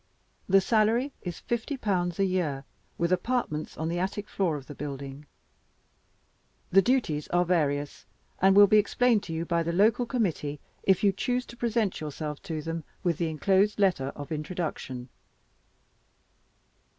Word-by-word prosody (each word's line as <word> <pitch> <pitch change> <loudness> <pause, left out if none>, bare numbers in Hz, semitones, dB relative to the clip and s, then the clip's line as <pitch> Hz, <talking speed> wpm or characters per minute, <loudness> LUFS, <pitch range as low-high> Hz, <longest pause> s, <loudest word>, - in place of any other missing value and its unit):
The 195 +1 +6
salary 230 +6 +2
is 175 -2 -6
fifty 240 +4 -2
pounds 180 -7 -1
a 195 - +4
year, 170 -8 -1 0.3
with 170 +1 0
apartments 185 -5 -1
on 160 - -2
the 170 +1 -1
attic 195 +3 -3
floor 180 -6 0
of 135 - -10
the 145 - -9
building. 140 0 -7 1.4
The 195 - +7
duties 195 - 0
are 175 0 +2
various, 145 -5 -1 0.3
and 190 +1 +5
will 205 0 +9
be 215 +1 +5
explained 235 +1 +2
to 165 - -5
you 160 +1 -2
by 170 0 +1
the 165 0 -1
local 215 +7 +3
committee, 170 - -1 0.2
if 190 0 +2
you 200 - +5
choose 250 +5 -1
to 235 - -12
present 230 -6 0
yourself 150 0 -5
to 155 -2 -3
them 165 0 -4 0.2
with 170 -4 0
the 170 -2 0
inclosed 190 +6 +2
letter 185 -10 +2
of 145 0 -8
introduction. 150 -6 -4
180 Hz, 155 wpm, -28 LUFS, 155-210 Hz, 1.4 s, will